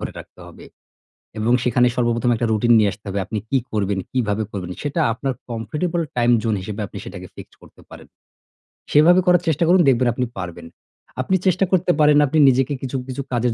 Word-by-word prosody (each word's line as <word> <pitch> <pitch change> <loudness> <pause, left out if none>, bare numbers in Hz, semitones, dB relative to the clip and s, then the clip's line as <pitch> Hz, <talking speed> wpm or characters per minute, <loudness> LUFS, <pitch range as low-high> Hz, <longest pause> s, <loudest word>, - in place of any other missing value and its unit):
ধরে - - -5
রাখতে - - -13
হবে - - -14 0.8
এবং 115 +3 +1
সেখানে 125 0 +3
সর্বপ্রথম 120 0 0
একটা 115 +1 -1
রুটিন 115 +2 +3
নিয়ে 105 -2 +2
আসতে 105 - -18
হবে। 100 +1 -2
আপনি 105 +2 -5
কি 135 - +2
করবেন, 100 -2 -1
কীভাবে 110 -4 -1
করবেন, 90 -3 -6
সেটা 145 +3 -2
আপনার 130 +3 -3 0.2
কমফোর্টেবল 150 - -3 0.2
টাইম 120 0 +3
জোন 110 -2 0
হিসেবে 105 +2 -6
আপনি - - -10
সেটাকে - - -9
ফিক্সড - - -12
করতে - - -18
পারেন। - - -13 0.8
সেভাবে 170 +5 +5
করার 180 -2 +4
চেষ্টা 160 +2 +1
করুন 180 +2 +5
দেখবেন 125 -1 +3
আপনি 125 +1 -2
পারবেন। 85 -2 -7 0.5
আপনি 190 +9 0
চেষ্টা 185 +1 +2
করতে 185 -1 +2
পারেন 150 -1 +5
আপনি 155 +4 -1
নিজেকে 135 +2 +1
কিছু, 135 0 -4
কিছু 130 +2 -5
কাজের 120 -1 0
125 Hz, 190 wpm, -20 LUFS, 110-150 Hz, 0.8 s, সেভাবে